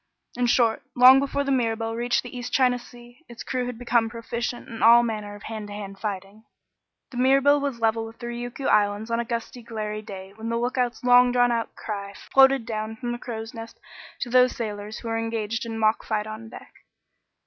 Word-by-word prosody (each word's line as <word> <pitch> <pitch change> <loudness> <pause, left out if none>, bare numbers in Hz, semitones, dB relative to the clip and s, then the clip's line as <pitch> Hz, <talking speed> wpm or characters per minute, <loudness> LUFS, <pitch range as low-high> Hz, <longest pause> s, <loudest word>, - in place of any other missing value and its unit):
In 245 0 +1
short, 235 -2 +3
long 255 +1 +8
before 280 +1 -1
the 275 - -1
Mirabelle 225 -3 0
reached 240 +1 0
the 245 0 -9
East 245 0 -5
China 250 -2 +3
Sea, 240 +1 -15
its 235 - -9
crew 255 -1 -2
had 250 -2 -5
become 235 -1 +1
proficient 235 +1 -5
in 225 -1 -8
all 235 +1 +7
manner 210 -3 -4
of 205 - -13
hand 220 -2 -6
to 205 - -8
hand 195 -1 -8
fighting. 200 0 -5 0.7
The 250 - -8
Mirabelle 275 +3 +4
was 280 -4 -3
level 225 0 +1
with 225 +1 -13
the 240 - -8
Ryukyu 240 +2 -5
Islands 205 +2 +2
on 230 - +1
a 235 - -1
gusty, 235 +1 -5
glary 215 -2 -5
day 195 -2 -9
when 220 +2 -6
the 230 - 0
lookout's 245 0 -1
long 245 0 +6
drawn 245 0 +3
out 230 -1 -2
cry 200 -2 -6
floated 270 0 +4
down 220 -1 -4
from 240 +1 -4
the 240 - -4
crow's 225 -1 -6
nest 225 -1 -9 0.4
to 245 - -3
those 250 0 +5
sailors 210 -1 -5
who 235 - -8
were 225 0 -1
engaged 225 0 -3
in 225 - -5
a - - -4
mock 220 0 +2
fight 210 -1 -1
on 215 +1 -8
deck. - - -12
230 Hz, 215 wpm, -25 LUFS, 220-245 Hz, 0.7 s, long